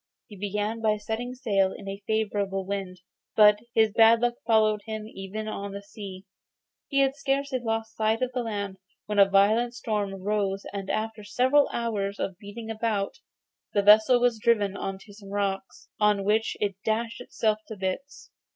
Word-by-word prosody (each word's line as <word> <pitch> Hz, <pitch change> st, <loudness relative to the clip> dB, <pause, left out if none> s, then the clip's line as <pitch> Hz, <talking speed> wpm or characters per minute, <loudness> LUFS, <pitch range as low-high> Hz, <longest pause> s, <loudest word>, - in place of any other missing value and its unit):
He 210 Hz, -, -13 dB
began 205 Hz, +3 st, -2 dB
by 215 Hz, -1 st, +2 dB
setting 225 Hz, +4 st, -4 dB
sail 200 Hz, -7 st, +1 dB
in 195 Hz, -, -9 dB
a 195 Hz, +1 st, -5 dB
favourable 200 Hz, -3 st, -1 dB
wind, 190 Hz, -2 st, -4 dB, 0.3 s
but 210 Hz, -1 st, +7 dB, 0.2 s
his 220 Hz, -1 st, +4 dB
bad 225 Hz, +2 st, +6 dB
luck 240 Hz, 0 st, +1 dB
followed 215 Hz, -2 st, +3 dB
him 220 Hz, -1 st, -5 dB
even 215 Hz, +1 st, -6 dB
on 200 Hz, -2 st, -5 dB
the 200 Hz, 0 st, -7 dB
sea. 195 Hz, -2 st, -9 dB, 0.6 s
He 275 Hz, -1 st, +2 dB
had 270 Hz, 0 st, +2 dB
scarcely 275 Hz, -1 st, -1 dB
lost 225 Hz, -1 st, -3 dB
sight 220 Hz, +2 st, +1 dB
of 255 Hz, -, -1 dB
the 250 Hz, -, -1 dB
land 200 Hz, -4 st, -4 dB, 0.3 s
when 210 Hz, -1 st, -1 dB
a 195 Hz, -1 st, +7 dB
violent 215 Hz, +5 st, +3 dB
storm 210 Hz, -4 st, -2 dB
arose, 195 Hz, 0 st, -1 dB
and 195 Hz, -1 st, -5 dB
after 220 Hz, 0 st, -2 dB
several 260 Hz, +7 st, +3 dB
hours 205 Hz, -4 st, -2 dB
of 190 Hz, -2 st, -3 dB
beating 220 Hz, +2 st, -7 dB
about, 215 Hz, -3 st, -2 dB, 0.5 s
the 205 Hz, -, +2 dB
vessel 215 Hz, +4 st, +7 dB
was 240 Hz, -2 st, +2 dB
driven 205 Hz, -3 st, +2 dB
on 195 Hz, -1 st, -4 dB
to 205 Hz, -, -14 dB
some 200 Hz, -1 st, -13 dB
rocks, 195 Hz, -1 st, -3 dB
on 210 Hz, -2 st, +3 dB
which 215 Hz, +2 st, +1 dB
it 200 Hz, -2 st, -1 dB
dashed 230 Hz, +2 st, -1 dB
itself 215 Hz, -3 st, 0 dB
to 220 Hz, -, -7 dB
bits. 195 Hz, +10 st, -5 dB
215 Hz, 175 wpm, -27 LUFS, 200-225 Hz, 0.6 s, but